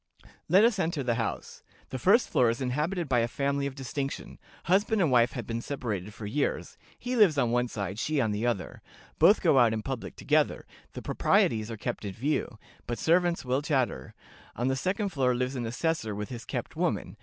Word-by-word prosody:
"... - - -26
Let 190 +6 +6
us 230 -4 +2
enter 160 -4 -1
the 120 -2 +1
house. 115 - -5 0.3
The 130 - -4
first 210 - +4
floor 120 -2 +3
is 115 - -2
inhabited 150 +7 -1
by 125 -3 +2
a 115 - +1
family 140 +2 -1
of 135 - -7
distinction; 135 +1 -5 0.2
husband 205 +4 +2
and 165 -7 +2
wife 120 -1 +4
have 120 -4 -5
been 115 0 -3
separated 110 -8 -4
for 105 0 -9
years; 130 +8 -2 0.2
he 250 +1 -3
lives 200 -10 +5
on 120 -4 +2
one 120 +1 +1
side, 100 -3 -5
she 155 +3 0
on 110 -5 +1
the 105 +2 -2
other; 100 -6 -3 0.4
both - - +6
go 135 - +5
out 115 -2 +5
in 110 -1 -3
public 130 -1 -5
together; - - +1 0.3
the - - -7
proprieties 110 -1 +2
are 115 - -5
kept - - -4
in 100 -2 -4
view, 130 -1 -2 0.3
but 120 - -2
servants 170 -1 +2
will 130 +2 +1
chatter. 130 - -1 0.4
On 120 +2 0
the 130 - +1
second 195 +8 -1
floor 130 -7 +1
lives 125 +2 -2
an 120 -3 -3
assessor 125 -3 -1
with 105 0 -5
his 120 -2 -7
kept - - -5
woman. - - -1
130 Hz, 210 wpm, -28 LUFS, 115-155 Hz, 0.4 s, Let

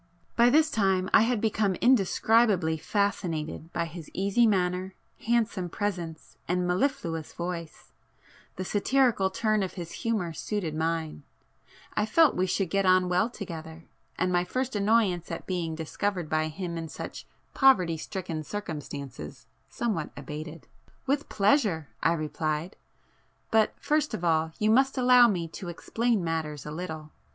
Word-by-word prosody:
By 235 +1 +6
this 310 +3 +4
time 190 -3 +1
I - - +8
had 235 0 +2
become 210 -3 +1
indescribably 215 -5 +3
fascinated 165 -3 -2
by 170 - -1
his 165 -1 -9
easy 200 +5 +3
manner, 185 -1 0 0.3
handsome 220 -6 +1
presence 175 -5 -4
and 180 +1 0
mellifluous 180 - -1
voice,—the 170 +1 -9
satirical 220 -1 +2
turn 215 +2 +1
of 190 - -3
his 170 -3 -7
humour 215 -8 -1
suited 180 -2 -3
mine,—I 160 +5 -5
felt 320 +7 +5
we 185 +1 +1
should 185 -2 -1
get 195 0 +2
on 185 -1 +4
well 180 +6 +2
together,—and 170 -2 -6
my 175 0 +3
first 255 +6 -3
annoyance 200 -4 +2
at - - -5
being 170 -4 -2
discovered 175 +2 -3
by 155 0 +1
him 170 +1 -5
in 165 - -5
such - - -8 0.3
poverty 185 - +4
stricken 165 -1 -5
circumstances 145 - -7 0.2
somewhat 205 -10 -2
abated. 150 +3 -7 0.4
"With 280 +2 0
pleasure!" 200 - +2
I 165 - +3
replied—"But 160 +7 -3
first 300 0 0
of 175 - -7
all, 160 -1 +2
you 215 +1 +2
must 265 +3 +3
allow 250 -1 +7
me 175 -6 -1
to 175 +2 -7
explain 225 +4 -1
matters 155 -3 -3
a 150 - -5
little. 155 -2 -6
180 Hz, 135 wpm, -28 LUFS, 160-215 Hz, 0.4 s, I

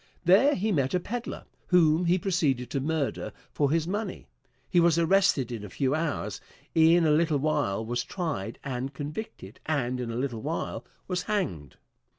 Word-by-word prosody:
There 215 - +6
he 215 +3 0
met 140 -3 +1
a - - +3
peddler, 235 +6 -5 0.2
whom 170 -1 +4
he 175 +2 +3
proceeded 150 -10 0
to 140 - 0
murder 150 0 -2 0.2
for 145 -2 +1
his 165 +2 +1
money. 205 +1 -3 0.4
He 175 - +3
was 170 -1 +4
arrested 165 -7 +3
in 115 -3 -5
a 105 - -7
few 130 +7 0
hours, 145 - -2 0.3
in 165 +1 +5
a 155 - +4
little 155 0 +3
while 140 -8 0
was 120 +1 -1
tried 150 - -4
and 135 +1 -4
convicted, 145 - -7
and 130 -5 0
in 120 -2 -3
a 115 - -4
little 125 -4 -2
while - - -3 0.2
was 180 0 -1
hanged. 90 - -3
155 Hz, 170 wpm, -27 LUFS, 125-175 Hz, 0.4 s, There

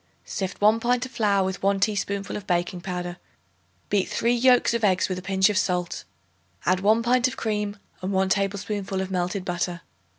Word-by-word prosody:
Sift 190 -2 -4
1 215 +2 +4
pint 245 +1 +1
of 255 - -10
flour 205 -5 +2
with 190 -1 -3
1 195 0 +2
teaspoonful 200 -1 -1
of 205 - -7
baking 175 0 -1
powder; 180 -1 -4 0.7
beat 200 -2 +1
three 235 +1 +1
yolks 245 0 +4
of 235 -1 -1
eggs 185 -3 +3
with 185 -1 -3
a - - -8
pinch 190 0 +3
of 205 - +1
salt; 180 -2 -2 0.6
add 185 +1 +3
1 215 +4 +3
pint 250 +1 +3
of 255 - -6
cream 210 -2 -2 0.2
and 185 +2 -2
1 190 0 +1
tablespoonful 195 0 -1
of 190 0 -3
melted 180 +1 -2
butter. 175 -1 -2
195 Hz, 190 wpm, -25 LUFS, 185-215 Hz, 0.7 s, 1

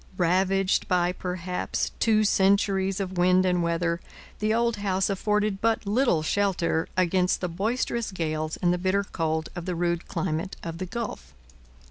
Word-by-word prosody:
Ravaged 190 +2 +2
by 180 -1 +2
perhaps 180 0 -3
two 215 -1 +3
centuries 195 -1 +2
of 185 -2 -3
wind 185 +1 +4
and 180 -1 +2
weather, 170 +1 0 0.4
the 215 +1 +1
old 235 0 +1
house 195 -1 0
afforded 210 0 0
but 225 -1 +1
little 205 - +2
shelter 175 -3 0
against 180 0 +2
the 180 - -2
boisterous 220 +5 -1
gales 155 -3 -2
and 175 0 +4
the 180 - -1
bitter 190 +2 +1
cold 160 -4 -2
of 175 -2 -5
the 180 - -1
rude 170 0 -1
climate 165 +2 -2
of 165 0 -5
the 185 - -4
Gulf. 230 - -6
185 Hz, 155 wpm, -26 LUFS, 170-200 Hz, 0.4 s, wind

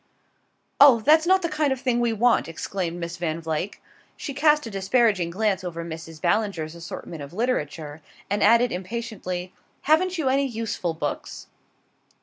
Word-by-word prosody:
"Oh, 275 -5 +8
that's 315 +6 +4
not 375 0 +4
the - - +1
kind 305 -3 0
of 265 - -1
thing 250 -2 0
we 240 -1 +1
want!" 230 +2 +2
exclaimed 170 +1 -4
Miss 170 0 -5
Van 165 -2 -2
Vluyck. 165 +4 -3 0.4
She 280 - -5
cast 300 +1 +3
a 225 - -6
disparaging 195 -2 +2
glance 195 0 0
over 170 -2 -5
Mrs. 165 -1 -8
Ballinger's 170 -3 0
assortment 170 -1 -8
of 140 +3 -9
literature, 160 - -2 0.3
and 205 +1 -1
added 235 +3 +5
impatiently: 185 -2 -5 0.3
"Haven't 350 +4 +2
you 310 -5 -1
any 275 +1 +2
useful 220 -8 -3
books?" 150 -2 -5
205 Hz, 155 wpm, -24 LUFS, 170-255 Hz, 0.4 s, Oh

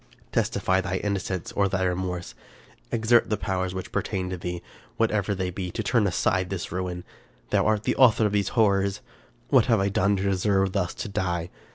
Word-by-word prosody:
" - - -33
Testify 95 0 +1
thy 95 0 -3
innocence 95 -3 -3
or 100 -1 +2
thy 95 0 0
remorse; 90 -1 -2 0.6
exert 115 +1 +3
the 105 - +1
powers 95 -1 -2
which 95 - -6
pertain 95 -3 -2
to 95 - -3
thee, 90 0 -5 0.3
whatever 105 -3 +1
they 95 -1 -2
be, 90 0 -4
to 110 - -4
turn 110 -1 +2
aside 90 0 +1
this 95 -3 -4
ruin. 90 0 -3 0.5
Thou - - +3
art 110 -1 +1
the - - 0
author 115 -4 +5
of 105 - +1
these 100 -1 +1
horrors! 100 -3 +2 0.5
What - - +5
have 115 -4 +4
I 100 +1 +1
done 100 +1 +2
to 95 - -2
deserve 95 0 +1
thus 90 -3 -1
to - - -5
die? 90 -4 -2
95 Hz, 195 wpm, -26 LUFS, 90-105 Hz, 0.6 s, author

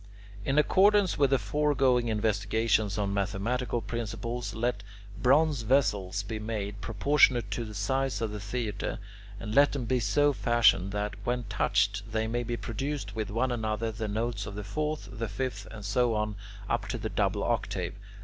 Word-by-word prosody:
In 135 +5 0
accordance 195 +5 +4
with 140 -2 +4
the 135 - +4
foregoing 130 +1 +2
investigations 110 -1 +1
on 100 -1 -1
mathematical 110 +5 -1
principles, 115 +1 -4
let 115 -2 -1 0.4
bronze 145 +1 +4
vessels 105 -6 +1
be 110 +1 -5
made, 105 -2 -4
proportionate 130 0 +3
to 120 - -2
the 105 -1 -8
size 130 +6 0
of 110 -2 -2
the 105 - -5
theatre, 105 0 -3 0.4
and 105 +1 -5
let 140 +3 +5
them 135 -4 -2
be 125 +2 +1
so 145 +7 +3
fashioned 120 -6 +3
that, 105 0 -2
when 125 0 -1
touched, 100 +2 +1
they 110 0 0
may 120 +2 -1
produce 120 +4 -4
with 110 -2 -3
one 120 +5 0
another 110 -1 -1
the 110 0 -4
notes 110 0 -2
of 100 - -7
the 105 - -5
fourth, 150 +10 -3
the 115 -2 -4
fifth, 115 -6 -4
and 105 -2 -9
so 120 +2 +2
on 105 -1 -1 0.3
up - - -1
to - - -3
the - - -3
double - - 0
octave. - - -1
115 Hz, 170 wpm, -29 LUFS, 105-125 Hz, 0.4 s, let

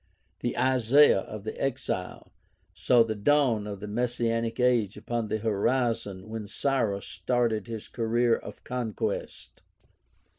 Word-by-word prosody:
The - - -3
Isaiah 130 0 +5
of 105 +1 -7
the 110 - -5
Exile 130 -9 -3 0.4
saw 120 -2 +4
the 110 -1 -2
dawn 115 -1 +2
of 100 -1 -6
the 105 - -5
messianic 115 +1 -1
age 120 -5 +2
upon 120 -2 -3
the 110 - -1
horizon 110 -2 -1
when 110 -1 -6
Cyrus 110 -5 -1
started 110 +3 -1
his 115 -2 -6
career 115 0 +1
of - - -10
conquest. 120 -4 -4
115 Hz, 125 wpm, -28 LUFS, 105-125 Hz, 0.4 s, Isaiah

